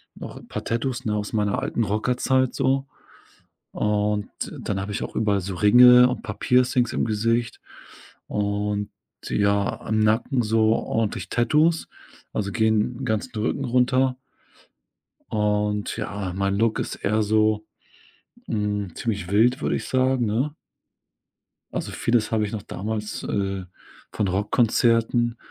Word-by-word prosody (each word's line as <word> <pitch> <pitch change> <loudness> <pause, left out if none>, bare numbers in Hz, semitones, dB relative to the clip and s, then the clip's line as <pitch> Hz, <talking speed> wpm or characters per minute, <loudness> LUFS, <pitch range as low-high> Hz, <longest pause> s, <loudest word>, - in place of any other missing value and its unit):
noch - - -9
'n - - -13
paar - - -5
Tattoos, 120 +2 -2
ne, 105 - 0
aus 105 +2 -4
meiner 105 -2 +1
alten 115 - -1
Rockerzeit 125 +4 +1
so. 135 +1 +1 0.9
Und 105 0 0 0.3
dann 95 -2 -2
habe 100 +1 -4
ich - - -3
auch - - -6
überall 105 -3 +1
so 95 +1 -5
Ringe 125 +5 +7
und 125 - -2
'n - - -14
paar - - -7
Piercings 125 -1 +2
im - - 0
Gesicht 115 +2 -1 0.7
und 105 0 -2 0.4
ja, 100 -1 +1
am 110 0 -1
Nacken 115 +4 +2
so 110 0 +2
ordentlich 110 -2 -2
Tattoos, 155 +7 +2 0.4
also 100 -1 -2
gehen 110 +2 +1
'n - - -3
ganzen 110 +3 -2
Rücken 105 - -1
runter 125 +1 +2 1.1
und 105 -1 0
ja, 100 -3 -4
mein 100 0 0
Look 115 +1 +1
ist - - -3
eher 110 +2 0
so, 110 0 +2 0.8
hm, 105 -4 -2
ziemlich 105 -6 -3
wild, 120 +5 +3
würde - - 0
ich - - -4
sagen, 130 -1 +2
ne? 125 +8 -1 1.2
Also - - -4
vieles 115 -2 0
habe 110 -1 +2
ich - - -7
noch 105 -3 -4
damals, 105 +2 -4
äh, 95 -1 -2 0.5
von 105 -3 -1
Rockkonzerten 115 +4 +2
110 Hz, 140 wpm, -24 LUFS, 105-120 Hz, 1.2 s, Ringe